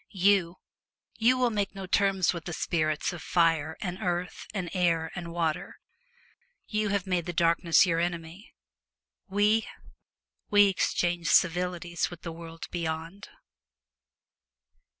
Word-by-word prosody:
You 190 -3 +2 0.3
— - - -34
you 245 +3 +4
will 250 -2 +2
make 205 -2 -2
no 195 -1 -6
terms 190 -1 +2
with 170 -2 -7
the 175 - -5
spirits 155 -1 -1
of 175 - -8
fire 165 -3 +1
and 180 -1 -4
earth 180 -2 -3
and 185 -4 -4
air 170 -3 +1
and 170 -2 -6
water. 165 -2 -2 0.9
You 215 -1 -1
have 200 -1 0
made 180 -3 -1
the 175 - -3
Darkness 170 +1 +4
your 165 -2 +1
enemy. 170 +2 -4 0.8
We 210 +3 +2 0.4
— - - -57
we 205 -1 +6
exchange 175 -3 0
civilities 175 0 +1
with 175 -2 -11
the 170 - -5
world 165 0 -9
beyond. 165 +3 -4
175 Hz, 135 wpm, -28 LUFS, 165-195 Hz, 0.9 s, we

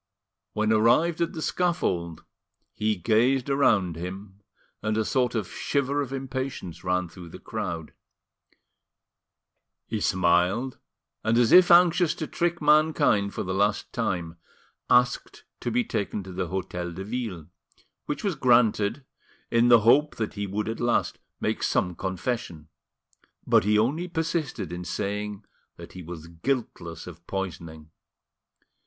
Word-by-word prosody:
When 110 0 +1
arrived 125 +11 +3
at 170 - 0
the 160 - -5
scaffold, 90 - -1 0.5
he 110 0 0
gazed 120 +7 +2
around 100 - +2
him, 95 +3 -8 0.4
and 110 +1 -1
a 110 - +1
sort 125 0 0
of 105 -5 -1
shiver 140 0 -1
of 135 -2 -5
impatience 130 - -5
ran 90 0 0
through 85 0 -12
the - - -10
crowd. 85 -8 -5 1.9
He 110 - -3
smiled, 95 +8 +1 0.4
and 110 +1 +2
as 120 -2 +3
if 180 0 +8
anxious 175 -1 +5
to 155 - -4
trick 170 +2 -1
mankind 150 -9 +3
for - - -2
the 95 - -3
last 100 +2 0
time, 90 -8 -2 0.5
asked 125 0 +2 0.2
to - - -3
be 120 +1 +1
taken 100 -1 -3
to 95 - -9
the 90 0 -3
Hotel 90 -1 -4
de 95 +3 -6
Ville, 105 -8 -5 0.6
which 145 - -3
was 200 -3 0
granted, 120 -2 +2 0.5
in 115 +1 +4
the 120 -2 +7
hope 140 +7 +4
that 110 -2 -3
he 100 -1 -4
would 105 +3 -3
at 115 - -4
last 120 0 0 0.2
make - - -1
some 90 -1 +1
confession; 95 -3 -4 0.8
but - - +4
he 105 0 +3
only 145 +11 +1
persisted 160 - -3
in 90 0 -5
saying 105 +2 -4 0.3
that - - -11
he 90 - -8
was 85 -1 -8
guiltless 85 - -4
of 85 -1 -12
poisoning. 80 -5 -6
110 Hz, 140 wpm, -26 LUFS, 90-130 Hz, 1.9 s, if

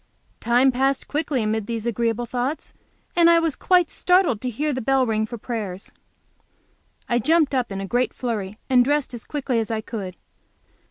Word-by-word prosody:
Time 245 +3 +3
passed 270 +2 0
quickly 290 -5 -1
amid 215 -1 -1
these 230 -1 -3
agreeable 235 0 -1
thoughts, 255 +5 -3 0.4
and 340 -1 +6
I 335 - +6
was 330 -3 +1
quite 360 -3 +3
startled 360 - +2
to 255 - -2
hear 290 +6 -2
the 260 - -3
bell 265 +2 +2
ring 220 -1 0
for 235 - -6
prayers. 210 -5 -5 1.2
I 240 -1 +1
jumped 315 +3 +2
up 250 -5 0
in 195 - -4
a 195 - -4
great 245 +3 0
flurry 215 -5 -4
and 255 -2 +5
dressed 290 0 0
as 235 - -7
quickly 270 -5 -1
as 225 - -2
I 220 -1 -2
could. 200 -5 -6
245 Hz, 180 wpm, -23 LUFS, 220-280 Hz, 1.2 s, and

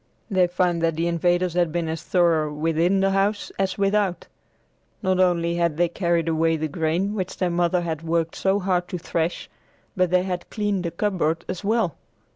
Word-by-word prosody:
They 185 -2 +4
found 175 -1 0
that 165 -1 +1
the 165 +2 -1
invaders 175 +1 +1
had 175 -2 +1
been 170 0 -1
as 160 +1 -3
thorough 165 -4 +2
within 165 +5 +1
the 195 0 +2
house 200 +2 0
as 190 -1 0
without. 200 -2 +1 0.8
Not 185 -1 +1
only 170 -2 +2
had 170 -3 0
they 175 0 +2
carried 170 -2 0
away 165 0 +2
the 155 0 -2
grain 165 +6 -1
which 190 -3 -4
their 180 -2 0
mother 175 +1 +1
had 165 -2 -3
worked 165 0 -1
so 195 +1 +1
hard 180 -2 0
to 180 - -4
thresh, 165 0 -2 0.5
but 185 -2 +2
they 180 +1 +3
had 180 -2 -4
cleaned 205 -4 -1
the - - 0
cupboard 170 -3 -1
as 185 +1 -5
well. 215 - 0
175 Hz, 190 wpm, -23 LUFS, 165-185 Hz, 0.8 s, They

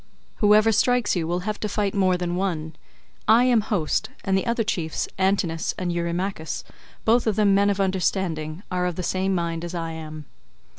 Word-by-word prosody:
Whoever 215 +1 +5
strikes 245 +1 +2
you 165 -3 -1
will 175 +2 -1
have 210 +2 -3
to 210 - -2
fight 205 -1 -1
more 185 -2 +2
than 175 -1 -2
one. 165 -5 -2 0.5
I 225 +3 +6
am 245 -3 +4
host, 200 -7 -1 0.2
and 195 -1 +2
the 190 - 0
other 235 0 +1
chiefs, 165 -8 -2
Antinous 190 -4 +1
and 180 -2 -2
Eurymachus, 170 0 -2 0.4
both 235 +1 +3
of 215 - +2
them 205 -2 +4
men 200 +1 +4
of 200 -1 0
understanding, 185 -3 -1
are 180 0 0
of 175 - -3
the 180 - -4
same 190 +2 0
mind 170 -1 -2
as 175 +1 -5
I 165 -1 -3
am." 155 -1 -8
185 Hz, 190 wpm, -24 LUFS, 170-205 Hz, 0.5 s, I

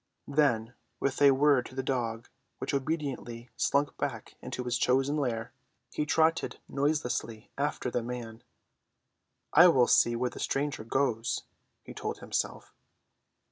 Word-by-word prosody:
Then, 125 -6 +1 0.3
with 140 +1 -1
a 140 - +8
word 135 -2 +4
to 130 - -14
the 130 - -2
dog, 120 -3 -2 0.3
which 130 - -4
obediently 135 -5 -3
slunk 145 +1 +1
back - - -4
into 125 - -5
his 125 0 -1
chosen 135 +3 +2
lair, 120 -6 -2 0.4
he 150 - -1
trotted 160 +3 +2
noiselessly 135 -6 -2
after 140 -3 -2
the 120 - 0
man. 115 -1 -6 1.1
"I 170 +4 +9
will 130 -8 +5
see 120 0 +4
where 125 +1 -1
the - - -10
stranger 140 -4 -1
goes," 115 -1 0 0.4
he - - -10
told - - -4
himself. - - -3
130 Hz, 140 wpm, -29 LUFS, 120-145 Hz, 1.1 s, I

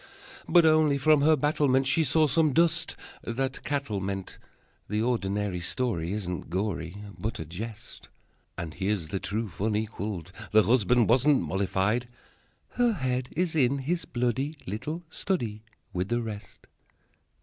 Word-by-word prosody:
But 175 -2 +6
only 155 -2 +4
from 150 +1 +4
her 155 +2 +5
battlement 145 -2 +2
She 150 +5 +3
saw 155 +2 +3
some 155 0 +3
dust 165 +1 +2 0.3
that 130 +3 -3
cattle 140 -8 -2
meant. 95 0 -4 0.5
The 105 +1 0
ordinary 105 -5 -1
story 85 -3 -1
Isn't 90 -6 -4
gory, 90 -1 -2 0.2
But 110 0 -3
a 80 - -5
jest. 105 +7 -8 0.5
But 80 -2 -5
here's 95 -3 -2
the 95 - -2
truth 105 -3 -4
unqualified. 105 -4 -2 0.2
The 110 0 +7
husband 120 0 +3
wasn't 130 0 +4
mollified 95 +7 0 0.6
Her 240 -2 +2
head 130 -6 -2
is 175 0 0
in 140 -2 +3
his 165 +6 -2
bloody 130 +5 -1
Little 150 - -4
study 115 - -2 0.3
With 90 +1 -1
the 120 0 0
rest! 105 -2 -8
120 Hz, 140 wpm, -28 LUFS, 100-145 Hz, 0.6 s, The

